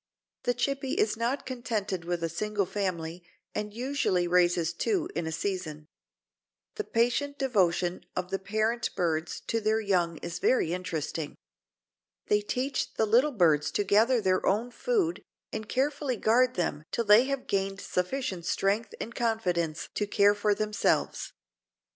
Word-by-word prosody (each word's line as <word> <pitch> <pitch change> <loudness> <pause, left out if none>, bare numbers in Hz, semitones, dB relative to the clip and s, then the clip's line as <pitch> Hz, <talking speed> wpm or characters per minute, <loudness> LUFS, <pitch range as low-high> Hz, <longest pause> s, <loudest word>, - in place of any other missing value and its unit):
The 245 - +2
Chippy 275 +2 -1
is 215 - +2
not 235 +5 -1
contented 220 -8 -3
with 175 -1 -2
a - - +2
single 205 +4 -1
family 175 -3 -3 0.3
and 210 0 -3
usually 235 -7 0
raises 175 -1 +3
two 350 - 0
in 160 - -2
a - - -2
season. 160 -3 -3 0.9
The 425 - -3
patient 250 +5 +1
devotion 185 -9 +1
of 180 0 -3
the 195 - -1
parent 220 +4 0
birds 165 -2 -1
to 230 - -2
their 220 +1 +2
young 180 -6 +1
is 170 - -5
very 175 -10 +2
interesting. 160 -4 -3 0.9
They 210 0 +4
teach 255 +6 -2
the 220 - +2
little 245 +8 +4
birds 155 -5 +4
to 205 - +1
gather 225 +5 +4
their 185 -2 +2
own 225 +5 +1
food 395 - 0 0.3
and 215 - -5
carefully 280 -1 0
guard 250 +4 +3
them 155 -4 -1
till 235 - -1
they 210 +4 +7
have 275 -1 -2
gained 195 0 -1
sufficient 185 -2 -2
strength 200 +3 0
and 230 - -5
confidence 180 -10 -1
to 210 - -1
care 205 0 +4
for 205 0 +1
themselves. 215 0 0
210 Hz, 150 wpm, -29 LUFS, 180-240 Hz, 0.9 s, they